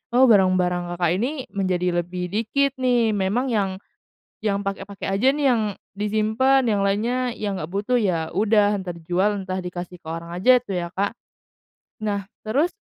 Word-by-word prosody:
"Oh, 260 - +6
barang-barang 180 -3 +2
Kakak 175 -2 +1
ini, 250 +6 0 0.2
menjadi 180 -3 0
lebih 180 +1 -5
dikit 245 +6 +1
nih." 240 -3 +3
Memang 210 +6 0
yang, 200 -3 +1 0.7
yang 200 -2 -1
pakai-pakai 195 0 -4
aja 260 +3 +5
nih, 295 -1 -1
yang 230 -2 +2 0.3
disimpen. 220 +6 +2
Yang 205 -2 +2
lainnya, 215 +5 +1 0.2
yang 200 -3 -3
nggak 155 +3 -6
butuh, 215 +6 +1
ya 170 -7 0
udah, 205 +1 +3
entah 180 -2 -5
dijual, 180 +5 0
entah 190 -1 -3
dikasih 180 0 -6
ke 160 - -16
orang 165 +1 -5
aja 245 +9 +5
tuh, 195 -6 -4
ya, 170 - -3
Kak. 200 +2 0 0.9
Nah, 205 -2 -2 0.2
terus 285 +11 +2
200 Hz, 165 wpm, -23 LUFS, 180-220 Hz, 0.9 s, Oh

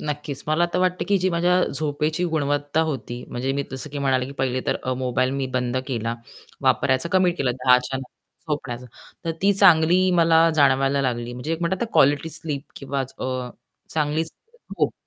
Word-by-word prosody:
नक्कीच, 145 -2 -4
मला 160 +3 +3
तर - - +1
वाटतं 180 0 +1
की 200 - +4
जी 185 +1 +1
माझ्या 180 +1 +2
झोपेची 150 +3 -1
गुणवत्ता 145 -2 0
होती, 120 -2 -6
म्हणजे 130 +2 -2
मी 140 +1 -1
जसं 130 +3 -5
की 145 - -5
म्हणाले 130 -2 +1
की 140 - -8
पहिले 130 -1 0
तर - - +1
अ, 130 - -1
मोबाईल 130 0 0
मी 135 0 -2
बंद 125 0 0
केला, 115 -3 -2 0.5
वापरायचा 130 +4 +2
कमी 185 -1 +4
केला. 140 -7 -1
10:00 125 0 +4
च्या 125 +1 -4
नंतर 135 +3 -10
झोपण्याचा. 125 -4 -4 0.4
तर 165 - -1
ती 200 +1 +5
चांगली 185 -1 +5
मला 165 0 +5
जाणवयला 135 -1 +3
लागली. 120 -2 -2
म्हणजे 125 +6 -4
एक 165 - -3
म्हणतात 185 +4 -1
ना, 230 - -3
क्वालिटी 145 +3 +3
स्लीप 150 -3 -3
किंवा 140 0 -3 0.2
अ, 130 -1 -3 0.5
चांगली 155 +1 +1
झोप. 460 - -5
145 Hz, 185 wpm, -23 LUFS, 130-165 Hz, 0.5 s, ती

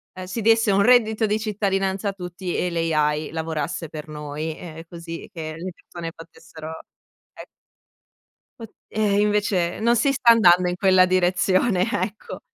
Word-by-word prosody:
uhm, 185 - -7
si 185 +5 -5
desse 225 -1 +3
un 200 +1 +3
reddito 225 -2 +4
di 210 +1 0
cittadinanza 195 -2 -1
a - - -4
tutti 180 -1 -6
e 180 - -1
l' 165 -1 -1
AI 150 0 0
lavorasse 160 0 -4
per 155 -1 -8
noi, 150 +1 -6
ehm, 165 -1 -9
così 165 +1 -9
che 155 -2 -6
le 180 +2 -6
persone 165 -1 -8
potessero, 160 -1 -11 0.5
e - - -11 1.1
Pu 225 - -7 0.2
ehm, 210 -2 +1
invece 205 -4 0
non 235 +2 +3
si 275 +4 +2
sta 245 -4 +5
andando 180 -5 +5
in 180 - -1
quella 185 -1 +4
direzione, 185 +2 +2
ecco. 210 0 -4
185 Hz, 160 wpm, -23 LUFS, 165-210 Hz, 1.1 s, sta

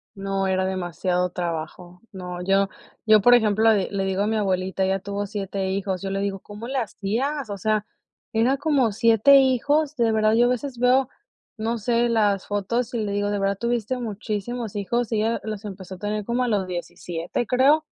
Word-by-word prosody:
No, 195 0 -2
era 190 0 +1
demasiado 180 -1 -1
trabajo. 175 +1 -5
No, 180 -2 -6
yo 195 +1 +2 0.4
yo, 215 -1 +7
por 245 +4 +6
ejemplo, 220 -1 +4
le 195 -3 0
le 195 -1 -1
digo 190 +1 -1
a 210 - 0
mi 220 - 0
abuelita, 190 -2 0
ella 190 +1 +1
tuvo 200 +1 -4
7 195 -1 -3
hijos. 190 -1 -2
Yo 195 - -3
le 195 - -1
digo: 195 -1 -2
"¿Cómo 210 +4 -9
le 270 +1 -3
hacías?". 240 +5 -2
O 200 - -4
sea, 215 +1 0 0.5
era 240 +5 +2
como 275 -7 +2
7 230 +5 +5
hijos. 285 +4 +2
De 230 -3 +2
verdad, 215 0 +3
yo 240 +1 +5
a - - +3
veces 250 0 -3
veo, 250 +2 +3 0.5
no 230 +2 -2
sé, 235 +2 +1
las 205 -4 +2
fotos 215 +5 -2
y 235 - -1
le 210 -2 -2
digo: 205 0 -1
"De 205 - -1
verdad 195 0 0
tuviste 235 0 -1
muchísimos 220 0 -4
hijos," 235 +4 -1
y 215 - +1
ella 225 +2 0
los 215 -1 -5
empezó 190 -2 -8
a - - -13
tener 210 +2 -3
como 240 +3 0
a - - 0
los 205 -5 0
17 175 +3 -4
creo, 275 +5 +4
210 Hz, 200 wpm, -24 LUFS, 195-235 Hz, 0.5 s, yo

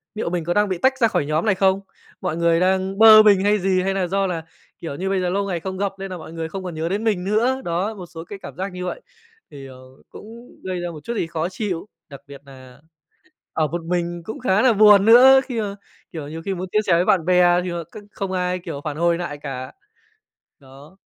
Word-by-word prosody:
"Liệu 215 - -3
mình 175 -1 -2
có 175 +2 -1
đang 205 +1 +2
bị 185 - -2
tách 260 +8 +1
ra 230 - +4
khỏi 150 - -1
nhóm 155 +5 -1
này 210 -3 +2
không? 190 0 +2 0.4
Mọi 180 -3 -3
người 170 0 +2
đang 190 +1 0
bơ 215 0 +9
mình 200 -3 +4
hay 205 +1 +2
gì? 185 0 +1
Hay 195 +1 -1
nà 190 -2 -1
do 195 +2 0
là, 170 -3 -4 0.4
kiểu 160 -4 -6
như, 190 +5 -3
bây 195 -1 0
giờ 180 - -1
lâu 200 +2 -1
ngày 180 -3 -2
không 190 +2 -6
gặp 200 0 -1
nên 195 0 -6
nà 185 - -6
mọi 160 -1 -11
người 165 -1 -5
không 190 +2 -6
còn 180 -2 -6
nhớ 160 +1 -3
đến 200 +4 -2
mình 210 -5 0
nữa?" 235 +7 0
Đó, 180 +6 -2
một 185 -3 -9
số 165 -1 -10
cái 195 +3 -10
cảm - - -10
giác 190 +2 -4
như 180 0 -5
vậy. - - -5 0.5
Thì, 135 -1 -10
ờ, 130 -1 -13 0.3
cũng - - -12 0.4
gây 185 -1 -4
ra 175 0 -4
một 155 -3 -11
chút 235 - -4
gì 175 - -2
khó 165 +1 -3
chịu, 185 -2 -4 0.2
đặc 140 -2 -11
biệt 140 -1 -12
nà 130 -2 -15 0.7
ở 155 -1 +1
một 170 +3 -4
mình 175 0 -2
cũng 220 - -7
khá 210 -4 +1
là 255 -1 +4
buồn 205 -1 +6
nữa, 260 +4 +8
khi 245 -4 -4
mà, 200 -2 -4 0.4
kiểu, 155 -4 -7
nhiều 160 +2 -7
khi 195 - -1
muốn 185 0 -5
chia 215 - +2
sẻ 185 - +4
với 170 +2 +3
bạn 180 -5 +2
bè 180 0 +4
thì, 180 - -4
ờ, 170 -1 -4
c 160 - -26 0.2
không 195 -2 -5
ai, 180 0 -1
kiểu, 165 -5 -7
phản 150 -1 -5
hồi 170 0 +2
nại 170 -4 -5
cả. 135 -3 -7 0.9
Đó. 140 +6 -17
180 Hz, 260 wpm, -21 LUFS, 165-200 Hz, 0.9 s, bơ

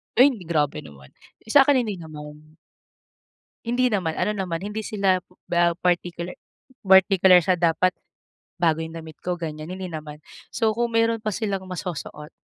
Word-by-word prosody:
Ay, 270 +3 +7
hindi 190 -9 -9
grabe 150 -4 0
naman. 70 -2 -14 0.3
Sa'kin 270 +2 +4
hindi 205 -5 -5
naman. 155 -1 -11 1.1
Hindi 245 +2 +1
naman, 185 -8 -1
ano 210 +3 +1
naman, 180 -4 -3
hindi 210 +1 -4
sila 195 -4 +1 0.3
ba 170 0 +2
partikular 175 0 -1 0.5
partikular 190 -1 +6
sa 185 - +3
"Dapat 175 +1 +2 0.7
bago 160 -2 +2
yung 160 +1 -8
damit 160 -2 -11
ko," 180 0 -1
ganyan. 155 0 -6
Hindi 185 0 -5
naman. 150 -1 -8 0.3
So, 220 -2 +1
kung 235 -1 -1
meron 230 -1 +2
pa 215 - 0
silang 195 -2 -2
masusuot, 155 -4 -6
180 Hz, 150 wpm, -24 LUFS, 160-210 Hz, 1.1 s, Ay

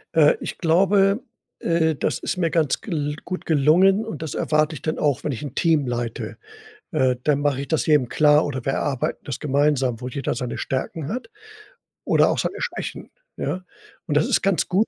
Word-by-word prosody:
Äh, - - +6
ich - - -6
glaube, 195 +4 +3 0.4
äh, 160 -2 +1
das - - -1
ist - - -3
mir 170 -2 +1
ganz 155 -5 +1
gl 150 -7 -2
gut 185 0 -5
gelungen 175 +8 +4
und 220 - -6
das 160 -3 -4
erwarte 155 +1 +1
ich - - -9
dann 155 - -2
auch, 145 -4 +1
wenn 145 - -1
ich 125 +3 -5
'n 140 -2 -7
Team 160 -6 +2
leite. 120 -1 -4 0.6
Äh, 130 -5 +2
dann 145 -2 +2
mache 145 -2 0
ich - - -8
das 160 - 0
jedem 150 -6 +3
klar 150 +2 +4
oder 130 -4 -4
wir 135 - 0
erarbeiten 135 -3 -1
das 140 - -5
gemeinsam, 135 -4 +1
wo 125 - -4
jeder 135 +2 -2
seine 120 0 -4
Stärken 140 +3 -3
hat 250 +4 -5 0.8
oder - - +4
auch - - 0
seine - - -2
Schwächen, - - -5 0.3
ja? 185 - -3 0.4
Und 150 -3 +1
das 155 - +2
ist - - +2
ganz 195 -3 +1
gut 195 +5 +2
150 Hz, 200 wpm, -23 LUFS, 135-170 Hz, 0.8 s, Äh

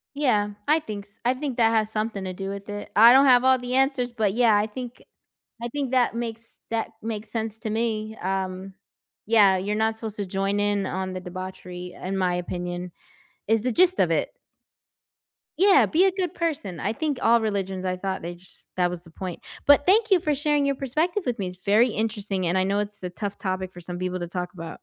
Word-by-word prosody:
Yeah, 215 -8 +2 0.2
I 310 +2 +4
think 205 -8 -7
s 210 +2 -23
I 250 +2 +3
think 270 -2 -4
that 225 -1 +5
has 220 -1 +1
something 215 -2 -2
to 185 - -4
do 195 +1 -5
with 200 +1 -6
it. 205 0 -6
I 230 +3 +9
don't 270 +2 +7
have 250 -1 +6
all 260 0 +5
the 250 +1 -2
answers, 265 -2 +1
but, 215 -4 0
yeah, 230 -3 +4
I 205 - +2
think 245 +2 -8 0.6
I 235 - -3
think 275 0 -3
that 250 -3 +2
makes 230 -1 -4 0.3
that 225 -1 -1
makes 220 -1 -5
sense 225 -1 -3
to 220 - -3
me, 220 -1 -2
um, 190 0 -3 0.5
yeah, 205 -3 +5
you're 205 +3 -2
not 220 +1 +1
supposed 220 -1 -7
to 205 - -3
join 195 +2 -1
in 205 -1 +1
on 185 0 -3
the 185 - -5
debauchery 180 -1 -7
in 190 +1 -2
my 185 -2 +1
opinion 175 0 -4 0.6
is 225 0 +3
the 250 - 0
gist 365 +6 +4
of - - +3
it. - - 0 1.3
Yeah, 390 +1 +6
be 340 +4 +3
a 380 - +2
good 365 -3 -2
person. 295 - -3
I 205 - -1
think 290 0 -2
all 230 +1 +4
religions, 195 -3 -2
I 185 0 -1
thought 190 0 -3
jus 175 +2 -8
that 180 -1 +2
was 175 -1 -6
the 165 - -16
point. 180 +1 -6 0.3
But 285 0 +6
thank 435 +4 +4
you 375 -3 +5
for 300 -2 0
sharing 295 0 +1
your 280 0 +1
perspective 315 - -1
with 245 -1 -1
me. 190 -2 -2
It's 180 0 -10
very 215 +5 +4
interesting 210 -4 -2
and 175 +2 +1
I 185 - +3
know 200 +1 0
it's 205 -1 -4
a 180 - -4
tough 200 +2 -5
topic 185 -2 -3
for 175 - -11
some 175 +1 -6
people 185 0 -2
to 175 - -4
talk 180 0 -4
about. 165 -2 -8
210 Hz, 220 wpm, -25 LUFS, 185-245 Hz, 1.3 s, I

